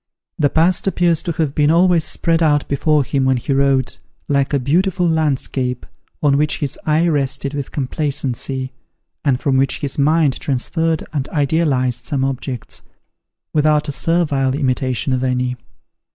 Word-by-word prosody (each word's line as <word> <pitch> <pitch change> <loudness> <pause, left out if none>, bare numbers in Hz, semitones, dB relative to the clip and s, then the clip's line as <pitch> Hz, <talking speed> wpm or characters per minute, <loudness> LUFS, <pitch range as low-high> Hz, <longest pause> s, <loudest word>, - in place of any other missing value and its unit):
The 145 -2 +3
past 170 +6 +2
appears 175 -4 +2
to 175 - -3
have 155 -4 -1
been 150 0 +2
always 170 0 +4
spread 165 +1 0
out 145 -2 +2
before 150 +1 +2
him 135 +1 -1
when 130 -1 +2
he 130 +3 -2
wrote, 135 -1 +1 0.3
like 140 -1 +1
a 145 - +2
beautiful 175 +7 +1
landscape, 135 -5 -1 0.4
on 140 -2 +4
which 150 +1 +1
his 145 -4 -3
eye 155 +3 +3
rested 140 -2 0
with 140 -2 -4
complacency, 135 -2 -2 0.5
and 135 -5 +1
from 135 -3 +1
which 135 0 +1
his 140 0 -3
mind 150 -1 +2
transferred 160 +4 -1
and 140 -3 -2
idealized 140 -5 0
some 135 -2 -1
objects, 130 -2 -5 0.7
without 150 0 +2
a - - -2
servile 145 -4 +1
imitation 130 -2 -1
of 130 0 -1
any. 125 -1 0
145 Hz, 150 wpm, -18 LUFS, 130-160 Hz, 0.7 s, always